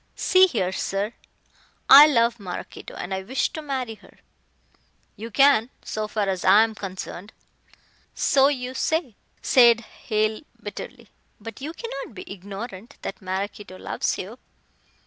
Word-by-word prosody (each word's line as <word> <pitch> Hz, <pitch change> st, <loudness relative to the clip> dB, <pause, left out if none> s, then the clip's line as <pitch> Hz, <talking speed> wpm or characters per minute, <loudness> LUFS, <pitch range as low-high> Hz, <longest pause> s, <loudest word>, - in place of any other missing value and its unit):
"See 375 Hz, 0 st, +5 dB
here, 190 Hz, -, -1 dB
sir; 200 Hz, +3 st, -2 dB, 0.7 s
I 285 Hz, +2 st, +11 dB
love 235 Hz, -4 st, +2 dB
Maraquito 185 Hz, -3 st, -8 dB
and 180 Hz, -, -5 dB
I 190 Hz, -, -2 dB
wish 255 Hz, +8 st, -1 dB
to 315 Hz, -, -7 dB
marry 265 Hz, -6 st, -3 dB
her." -, -, -19 dB, 1.0 s
"You 225 Hz, +3 st, -8 dB
can, 265 Hz, -2 st, +4 dB, 0.2 s
so 215 Hz, 0 st, -3 dB
far 210 Hz, -1 st, -1 dB
as 190 Hz, -2 st, -2 dB
I 215 Hz, +2 st, +7 dB
am 225 Hz, -1 st, -2 dB
concerned," 195 Hz, 0 st, -7 dB, 0.8 s
"So 275 Hz, 0 st, +4 dB
you 255 Hz, -3 st, -2 dB
say," 310 Hz, -, -1 dB, 0.3 s
said 235 Hz, -3 st, +6 dB
Hale 215 Hz, -1 st, -2 dB, 0.2 s
bitterly, -, -, -9 dB, 0.3 s
"but 225 Hz, +3 st, -9 dB
you 300 Hz, +3 st, -4 dB
cannot 275 Hz, -, -7 dB
be -, -, -8 dB
ignorant 200 Hz, +4 st, -9 dB
that 195 Hz, -, -6 dB
Maraquito 190 Hz, +1 st, -5 dB
loves -, -, -2 dB
you." 215 Hz, +7 st, -8 dB
220 Hz, 140 wpm, -24 LUFS, 200-260 Hz, 1.0 s, I